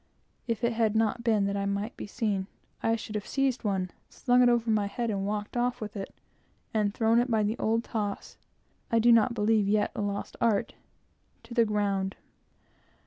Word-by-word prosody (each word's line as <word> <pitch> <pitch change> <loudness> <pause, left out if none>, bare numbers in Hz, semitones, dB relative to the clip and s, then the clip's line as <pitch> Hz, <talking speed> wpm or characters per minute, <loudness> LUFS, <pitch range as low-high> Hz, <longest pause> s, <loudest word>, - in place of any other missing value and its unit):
If 230 -1 -2
it 235 0 +2
had 220 -2 +1
not 225 +2 +1
been 220 -4 +2
that 200 0 -1
I 200 0 -1
might 200 +3 -2
be - - -7
seen, 205 -3 -1 0.3
I 225 - +2
should 220 -1 -7
have 210 -1 -4
seized 270 -3 0
one, 190 -4 -1 0.2
slung 250 -1 +2
it 245 - +6
over 235 -1 +2
my 210 -2 +2
head, 230 0 -2
walked 205 +2 -3
off 245 0 0
with 210 -1 -6
it, 195 -1 -5 0.6
and 210 -2 +1
thrown 225 +2 +3
it 245 +2 +1
by 220 -2 +2
the 210 +2 0
old 225 +1 +1
toss 205 -4 -4 0.6
I 230 - +3
do 235 +1 +5
not 230 +1 +4
believe 210 -1 +2
yet 205 0 +2
a - - -2
lost 200 0 -4
art 220 -4 +1 0.7
to 230 +1 -10
the 235 -1 +4
ground. 200 -2 0
215 Hz, 195 wpm, -28 LUFS, 205-230 Hz, 0.7 s, it